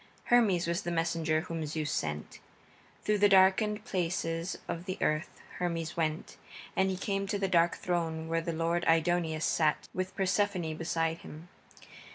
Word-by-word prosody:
Hermes 205 -8 +4
was 170 +3 -1
the 175 - -4
messenger 165 -2 0
whom 165 -1 -4
Zeus 150 -1 -2
sent. 75 -1 -3 0.6
Through 210 -1 +1
the 205 0 +6
darkened 200 +3 +4
places 170 -1 -2
of 170 +1 -4
the 185 -1 -4
earth 155 +3 0 0.3
Hermes 170 -2 -2
went, 160 -1 -2 0.4
and 190 0 +3
he 190 - -2
came 195 +1 -2
to 205 - -1
that 195 -1 -1
dark 170 -1 +4
throne 165 -2 -2
where 165 0 0
the 170 - -3
lord 165 +1 0
Aidoneus 165 -1 +2
sat, 155 -2 +1
with 185 0 -3
Persephone 190 -3 0
beside 165 0 -1
him. 160 +4 -11
170 Hz, 160 wpm, -31 LUFS, 165-190 Hz, 0.6 s, the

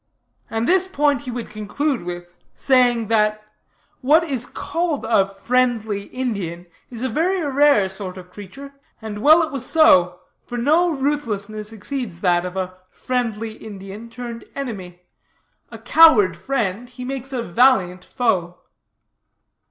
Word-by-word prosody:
And 225 +2 -2
this 375 +1 +3
point 290 -7 +1
he 265 - -7
would 240 -1 -6
conclude 235 +6 -2
with 175 0 -6 0.3
saying, 245 -4 +2
that, 215 -1 +1 0.6
'what 300 +6 +4
is 265 -7 -3
called 330 -4 -3
a 200 -4 +2
"friendly 220 -1 0
Indian" 200 -10 -4 0.2
is 240 0 -6
a - - +1
very 340 +10 0
rare 280 -7 +4
sort 190 -1 -6
of 180 -1 -12
creature; 210 +9 -11 0.3
and 215 -2 -7
well 315 +6 +6
it 315 - -4
was 275 -4 -4
so, 180 - +4 0.3
for 245 - -5
no 315 +8 +3
ruthlessness 225 -8 -3
exceeds 220 -4 -5
that 175 -2 +2
of 180 +1 -6
a 185 0 -4
"friendly 225 -3 -3
Indian" 210 +1 -10
turned 235 -1 -8
enemy. 190 -10 -6 0.7
A - - -9
coward 230 - +5
friend, 230 +1 -2
he 250 0 -9
makes 270 0 -5
a 250 -3 -2
valiant 185 -5 +2
foe. 185 -9 -1
230 Hz, 140 wpm, -21 LUFS, 195-270 Hz, 0.7 s, well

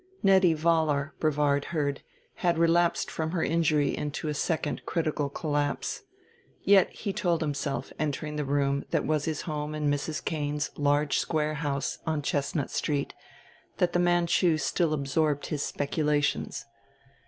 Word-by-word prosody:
Nettie 190 -4 +5
Vollar, 155 -2 +1
Brevard 145 -2 +2
heard, 145 -4 -2 0.4
had 175 -6 +1
relapsed 170 +1 +2
from 160 +1 -3
her 170 - 0
injury 155 -3 +2
into 150 +1 -3
a - - -1
second 150 0 -1
critical 155 -4 -1
collapse. 145 -1 -2 0.6
Yet, 195 -2 +5
he 200 -3 -5
told 170 -3 0
himself, 140 -2 -2
entering 150 0 -2
the 150 - -1
room 140 0 +1
that - - 0
was 155 -1 0
his 155 -2 -2
home 150 -2 -4
in 150 -1 +1
Mrs. 145 +2 -3
Cane's 150 -1 -2
large 145 -1 +2
square 155 -1 0
house 145 -3 -2
on 155 -2 0
Chestnut 145 0 -1
Street, 145 -2 -1 0.6
that 175 -1 +1
the 175 - +2
Manchu 175 -1 +3
still 165 +1 0
absorbed 145 +1 0
his 150 -3 -3
speculations. 145 -4 -1
150 Hz, 140 wpm, -28 LUFS, 145-165 Hz, 0.6 s, Nettie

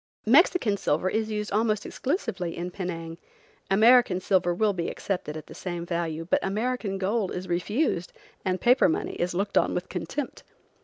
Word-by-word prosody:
Mexican 255 - +4
silver 180 +1 0
is 220 0 -1
used 210 -1 -3
almost 215 0 +1
exclusively 235 - -3
in 175 +1 -4
Penang. 170 -3 -5 0.5
American 220 -1 +5
silver 185 -1 +2
will 205 +4 +2
be 170 -2 -2
accepted 180 -6 -4
at 155 - -8
the - - -12
same 175 -2 -5
value, 165 -2 -2
but - - +2
American 215 0 -1
gold 200 +1 0
is 180 +1 -5
refused 180 - 0 0.3
and 185 -1 0
paper 250 -3 +5
money - - -1
is 175 0 -1
looked 200 +2 +2
on - - 0
with 180 - -3
contempt. 185 - -4
190 Hz, 165 wpm, -26 LUFS, 175-220 Hz, 0.5 s, American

